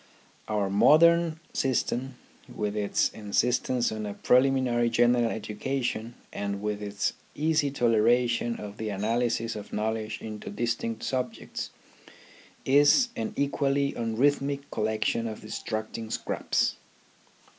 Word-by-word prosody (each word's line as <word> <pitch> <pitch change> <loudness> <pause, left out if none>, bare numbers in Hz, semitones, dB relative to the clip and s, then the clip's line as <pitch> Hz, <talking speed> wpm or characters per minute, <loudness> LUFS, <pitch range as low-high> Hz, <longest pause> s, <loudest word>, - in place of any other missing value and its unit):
Our 105 -3 0
modern 165 +8 +5
system, 130 0 -1 0.4
with 105 0 -3
its 105 -1 +1
insistence 120 +3 0
on 110 -1 -4
a 100 - -5
preliminary 125 -2 +3
general 120 +1 +3
education, 115 +1 -3 0.2
and 100 0 -3
with 105 0 -3
its 100 -1 -2 0.2
easy 155 -1 +2
toleration 120 -1 +2
of 105 -1 -8
the 110 -1 -3
analysis 115 +3 0
of 105 -1 -8
knowledge 110 0 -2
into 110 -1 -7
distinct 115 +1 -2
subjects, 125 -3 -3 1.0
is 145 - +5
an 225 -3 -3
equally 140 0 +1
unrhythmic 140 +5 +1
collec 110 0 -1
tion 115 0 0
of 110 - -6
distracting 110 +1 -5
scraps. - - -1
115 Hz, 115 wpm, -27 LUFS, 110-135 Hz, 1.0 s, modern